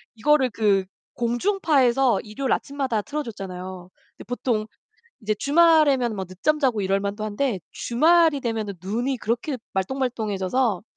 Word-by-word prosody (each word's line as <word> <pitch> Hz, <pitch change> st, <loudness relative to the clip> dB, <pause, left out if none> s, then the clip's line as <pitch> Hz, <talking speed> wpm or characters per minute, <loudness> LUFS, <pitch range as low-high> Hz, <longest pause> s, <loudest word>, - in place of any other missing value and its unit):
이거를 265 Hz, +3 st, +3 dB
그 205 Hz, -4 st, +1 dB, 0.3 s
공중파에서 265 Hz, -, +2 dB
일요일 240 Hz, +5 st, -4 dB
아침마다 265 Hz, -6 st, -1 dB
틀어줬잖아요. 190 Hz, -9 st, -6 dB, 0.3 s
근데 -, -, -10 dB
보통 240 Hz, -3 st, -1 dB, 0.6 s
이제 215 Hz, -1 st, -1 dB
주말에면 285 Hz, -3 st, +4 dB
뭐 190 Hz, -, -3 dB
늦잠 195 Hz, -, -1 dB
자고 250 Hz, -7 st, +1 dB
이럴 195 Hz, 0 st, +1 dB
만도 205 Hz, +2 st, -3 dB
한데 215 Hz, 0 st, -1 dB
주말이 315 Hz, +3 st, +3 dB
되면 225 Hz, -4 st, -2 dB, 0.2 s
눈이 240 Hz, +7 st, -2 dB
그렇게 240 Hz, +6 st, -2 dB, 0.2 s
말똥말똥 230 Hz, +2 st, -2 dB
해져서 200 Hz, +1 st, 0 dB
235 Hz, 330 characters per minute, -24 LUFS, 205-275 Hz, 0.6 s, 주말에면